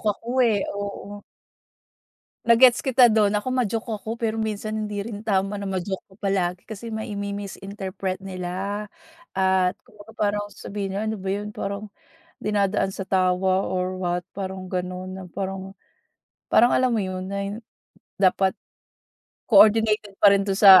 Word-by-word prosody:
ako, 230 Hz, +3 st, -14 dB
eh, 215 Hz, -4 st, +2 dB
oo. 205 Hz, 0 st, -6 dB, 1.2 s
Na-gets 235 Hz, +1 st, +6 dB
kita 255 Hz, -2 st, +6 dB
dun. 215 Hz, -2 st, +3 dB
Ako 210 Hz, +4 st, -1 dB
ma-joke 235 Hz, -3 st, -1 dB
ako, 225 Hz, +3 st, -6 dB
pero 225 Hz, -1 st, 0 dB
minsan 215 Hz, -1 st, -2 dB
hindi 210 Hz, -1 st, -3 dB
rin 210 Hz, 0 st, -6 dB
tama 195 Hz, -1 st, +1 dB
na 200 Hz, -, -5 dB
ma-joke 190 Hz, 0 st, -3 dB
ka -, -, -16 dB
palagi 180 Hz, -2 st, 0 dB
kasi 225 Hz, +1 st, -7 dB
mai 220 Hz, -1 st, -4 dB
mi-misinterpret 200 Hz, -1 st, -4 dB
nila. 190 Hz, +2 st, -4 dB, 0.5 s
At 190 Hz, -1 st, +2 dB
kumbaga 210 Hz, +1 st, -16 dB
parang 205 Hz, -1 st, 0 dB
sabihin 195 Hz, -1 st, -5 dB
nila, 210 Hz, +3 st, -2 dB
"Ano 220 Hz, -, -2 dB
ba 190 Hz, -1 st, -3 dB
yun 210 Hz, +1 st, -4 dB
parang 200 Hz, +2 st, -4 dB, 0.5 s
dinadaan 200 Hz, -2 st, 0 dB
sa 195 Hz, -, -4 dB
tawa 185 Hz, 0 st, +2 dB
or 185 Hz, 0 st, -2 dB
what." 175 Hz, -1 st, -1 dB
Parang 190 Hz, -1 st, -6 dB
gano'n 185 Hz, 0 st, -3 dB
na 190 Hz, 0 st, -7 dB
parang 195 Hz, +1 st, -5 dB, 0.8 s
parang 240 Hz, -, +7 dB
alam 255 Hz, 0 st, +2 dB
mo 225 Hz, -, +1 dB
yun, 185 Hz, -1 st, -3 dB
na 200 Hz, +1 st, -3 dB, 0.7 s
dapat 190 Hz, 0 st, +4 dB, 0.9 s
coordinated 215 Hz, -1 st, +5 dB
pa 200 Hz, 0 st, +7 dB
rin 200 Hz, -, +4 dB
dun 195 Hz, -1 st, -1 dB
sa 195 Hz, -3 st, +10 dB
200 Hz, 145 wpm, -24 LUFS, 190-210 Hz, 1.2 s, sa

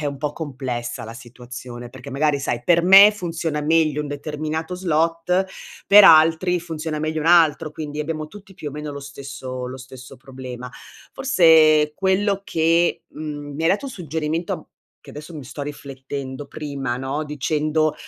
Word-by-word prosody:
è 150 Hz, -, -2 dB
un 140 Hz, -1 st, -3 dB
po' 150 Hz, 0 st, -2 dB
complessa 130 Hz, -6 st, -5 dB
la 115 Hz, +1 st, -8 dB
situazione 120 Hz, -1 st, -10 dB
perché 130 Hz, +2 st, -11 dB
magari, 145 Hz, +1 st, +1 dB
sai, 120 Hz, -3 st, -3 dB
per 170 Hz, 0 st, +3 dB
me 195 Hz, +3 st, +9 dB
funziona 165 Hz, -6 st, -3 dB
meglio 155 Hz, -1 st, +2 dB
un -, -, -6 dB
determinato 155 Hz, +3 st, -4 dB
slot, 170 Hz, +2 st, 0 dB, 0.4 s
per 205 Hz, 0 st, +9 dB
altri 165 Hz, +3 st, +5 dB
funziona 160 Hz, -2 st, -5 dB
meglio 155 Hz, +1 st, -2 dB
un 155 Hz, -, -3 dB
altro, 160 Hz, -2 st, +4 dB
quindi 150 Hz, -1 st, -6 dB
abbiamo 155 Hz, 0 st, -4 dB
tutti 200 Hz, 0 st, -14 dB
più 150 Hz, -, -6 dB
o -, -, -8 dB
meno 150 Hz, +1 st, -6 dB
lo 140 Hz, -, -7 dB
stesso 135 Hz, -2 st, -7 dB
lo 130 Hz, -, -7 dB
stesso 130 Hz, 0 st, -12 dB
problema. 130 Hz, -1 st, -9 dB, 0.4 s
Forse 160 Hz, -, +5 dB
quello 195 Hz, +1 st, +1 dB
che 165 Hz, +1 st, +1 dB
mhmm, 145 Hz, -2 st, -7 dB
mi 160 Hz, -, -4 dB
hai -, -, +4 dB
dato 240 Hz, +8 st, 0 dB
un -, -, -6 dB
suggerimento 160 Hz, -3 st, -4 dB, 0.3 s
che -, -, -14 dB
adesso 150 Hz, +3 st, -10 dB
mi 145 Hz, -, -8 dB
sto 140 Hz, +3 st, -7 dB
riflettendo, 135 Hz, -1 st, -7 dB
prima, 140 Hz, -5 st, -4 dB
no, 135 Hz, +4 st, -3 dB
dicendo, 155 Hz, +1 st, 0 dB
150 Hz, 165 wpm, -22 LUFS, 135-165 Hz, 0.4 s, me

